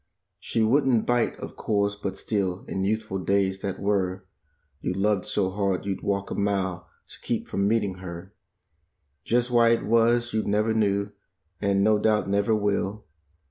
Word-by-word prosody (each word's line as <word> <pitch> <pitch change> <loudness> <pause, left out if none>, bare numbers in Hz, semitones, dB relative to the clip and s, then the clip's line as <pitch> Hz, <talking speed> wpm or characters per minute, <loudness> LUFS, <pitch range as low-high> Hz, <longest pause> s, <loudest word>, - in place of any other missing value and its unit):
She 115 - -1
wouldn't 125 0 +3
bite, 120 -1 +1
of - - -8
course, 100 -1 0
but 100 -1 -5
still 95 -4 -2
in 95 - -2
youthful 105 -1 -1
days 95 0 +1
that 100 -2 -4
were 95 -2 -1 0.6
You 90 - -1
loved 100 -1 +1
so 95 -2 0
hard 100 -2 -1
you'd 100 -1 -3
walk 100 -1 -2
a - - 0
mile 95 -4 -1 0.2
to - - -8
keep - - -2
from 100 0 0
meeting 105 -4 0
her. 90 +1 -8 0.9
Just 120 +1 +1
why 120 -1 +5
it 115 - +2
was 115 +1 +3
you 110 - +1
never 105 +2 +1
knew, 100 -2 +1 0.5
and 100 -1 +2
no 105 0 +4
doubt 105 -1 +2
never 100 +3 +2
will. 105 0 -1
100 Hz, 165 wpm, -26 LUFS, 95-110 Hz, 0.9 s, why